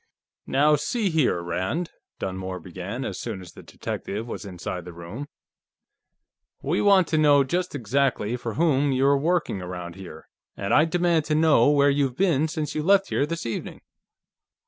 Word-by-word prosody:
"Now, 150 +3 +4
see 200 - -1
here, 145 - +2
Rand," 95 - -2 0.3
Dunmore 95 -1 -4
began, 95 +9 -6
as 95 - -5
soon 110 -5 -5
as 90 -2 -11
the - - -12
detective 105 +3 -5
was 115 - -6
inside 90 -1 -5
the 90 0 -10
room, 85 +12 -8 1.4
"we 155 +6 0
want 195 -3 +5
to 155 - +2
know 145 -2 +5
just 175 +4 -2
exactly 125 -2 0
for 120 -3 -5
whom 145 -3 +2
you're 135 +2 +3
working, 165 - 0
around 90 -1 -6
here. 90 -4 -11 0.3
And 100 0 -1
I 155 - +6
demand 170 -1 +1
to 150 - 0
know 155 -5 +5
where 145 -1 +4
you've 140 -3 0
been 160 -6 +2
since 155 -2 -3
you 155 - -1
left 195 +4 +3
here 145 - +1
this 165 -2 -4
evening." 115 - -5
140 Hz, 170 wpm, -25 LUFS, 95-160 Hz, 1.4 s, I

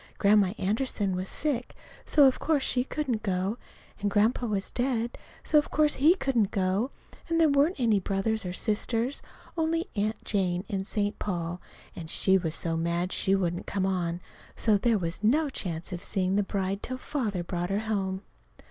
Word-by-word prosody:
Grandma 200 -2 +4
Anderson 205 -1 -1
was 185 +1 -3
sick, 275 -5 -2 0.3
so 290 -2 +6
of 265 - +4
course 300 -4 +1
she 250 -1 +1
couldn't 260 -5 -2
go, 195 +2 -1 0.4
and 205 - 0
Grandpa 220 +4 +2
was 200 -3 -1
dead, 240 -2 -1 0.3
so 300 - +5
of 295 - -3
course 300 -1 +3
he 310 +6 +6
couldn't 245 - +1
go, 195 +5 0 0.4
and 330 0 +2
there 325 - +6
weren't 285 +6 +3
any 225 -5 +3
brothers 200 +3 -1
or 180 - -4
sisters, 225 +6 -1 0.3
only 330 +3 0
Aunt 215 +1 -2
Jane 185 -2 0
in 195 -3 -2
St. 205 0 -1
Paul, 175 -2 -3 0.3
and 160 -2 -7
she 190 +3 +4
was 165 -4 0
so 165 -1 -1
mad 170 +2 -1
she 195 - +2
wouldn't 175 -2 -1
come 195 -2 0
on. 175 -2 -1 0.3
So 215 -2 +3
there 225 +2 +2
was 170 +2 -3
no 285 +7 +3
chance 175 -4 -4
of 175 - -5
seeing 190 -1 0
the 205 - +3
bride 195 0 -2
till 255 +1 -3
Father 220 - -2
brought 175 0 -3
her 200 +2 0
home. 195 -3 -2
205 Hz, 180 wpm, -28 LUFS, 185-250 Hz, 0.4 s, so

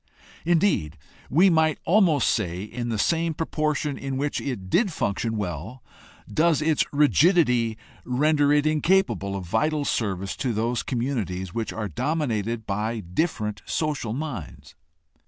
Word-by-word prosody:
Indeed, 165 - +2 0.3
we 180 +6 +5
might 160 -2 +3
almost 175 -7 +4
say, 90 -4 -2
in 120 +3 -5
the 115 - -1
same 165 +7 +1
proportion 150 -2 -1
in 135 -1 -3
which 145 +2 -1
it 120 -9 -4
did 195 - +2
function 110 -4 -2
well 100 - -5 0.4
does 165 -1 +2
its 155 -1 +2
rigidity 145 - +3 0.3
render 145 +3 +2
it 150 0 +3
incapable 150 - +1
of 95 -2 -5
vital 145 - 0
service 100 -6 -1
to 125 -4 -1
those 115 +2 0
communities 110 -8 -3
which 115 -1 -3
are 110 -1 -3
dominated 115 - -2
by 110 +2 -2
different 105 - -2
social 150 -8 -2
minds. 85 - -6
125 Hz, 135 wpm, -25 LUFS, 105-155 Hz, 0.4 s, we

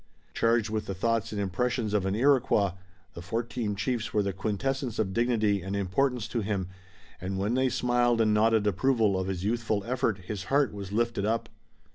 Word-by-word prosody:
Charged 115 -1 +2
with 110 -1 -2
the 95 - -3
thoughts 115 +3 0
and 105 - -3
impressions 110 +3 -1
of 100 -2 +1
an 95 - 0
Iroquois, 120 -6 +3 0.4
the 85 - -8
fourteen 110 +2 -2
chiefs 115 +2 -2
were 105 - +2
the 100 -1 -2
quintessence 120 +5 -2
of 95 -3 -1
dignity 110 -4 +2
and 95 +3 -4
importance 110 +5 0
to 120 - -1
him, 100 -3 -2 0.5
and 95 +1 -3
when 100 +4 0
they 130 +1 +2
smiled 120 -1 +2
and 110 -1 +3
nodded 110 0 +3
approval 110 0 +2
of 95 - -2
his 95 -2 -3
youthful 110 -1 0
effort 115 -3 0
his 95 0 -6
heart 140 0 +2
was 100 -1 -7
lifted 115 -1 0
up. 110 +2 -1
110 Hz, 185 wpm, -28 LUFS, 100-120 Hz, 0.5 s, Iroquois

